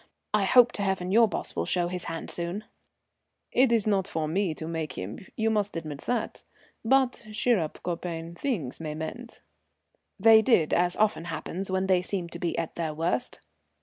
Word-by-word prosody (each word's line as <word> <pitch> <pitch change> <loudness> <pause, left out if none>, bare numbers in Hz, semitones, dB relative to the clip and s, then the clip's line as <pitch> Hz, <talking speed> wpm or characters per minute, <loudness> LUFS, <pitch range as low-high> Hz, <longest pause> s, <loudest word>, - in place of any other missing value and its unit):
I 210 -2 +3
hope 245 +3 +6
to - - -5
heaven 190 -2 -1
your 230 +2 +6
boss - - -5
will - - -1
show 175 -1 +1
his 180 0 -4
hand 165 -1 -5
soon." 175 +5 -3 0.9
"It's 235 -4 +4
not 200 -3 +1
for 160 -6 -2
me 175 0 0
to 160 - -6
make 160 -2 -3
him, 95 +4 -6 0.2
you 225 0 +1
must 205 -4 0
admit 155 -3 -6
that. 240 -3 -2 0.4
But 260 +1 +2
cheer 230 0 +2
up, 155 -2 -4
copain, 170 -1 -4
things 175 - -3
may 155 -2 -4
mend." 230 +10 -7 0.8
They 220 +2 +8
did, 220 -10 +3
as 175 0 +3
often 210 -6 +1
happens 180 +3 -5
when 190 0 0
they 185 -2 +3
seem 180 -2 -3
to 170 - -8
be 170 -1 -2
at 165 -1 -2
their 160 -3 -3
worst. 160 -6 -1
180 Hz, 180 wpm, -27 LUFS, 165-215 Hz, 0.9 s, They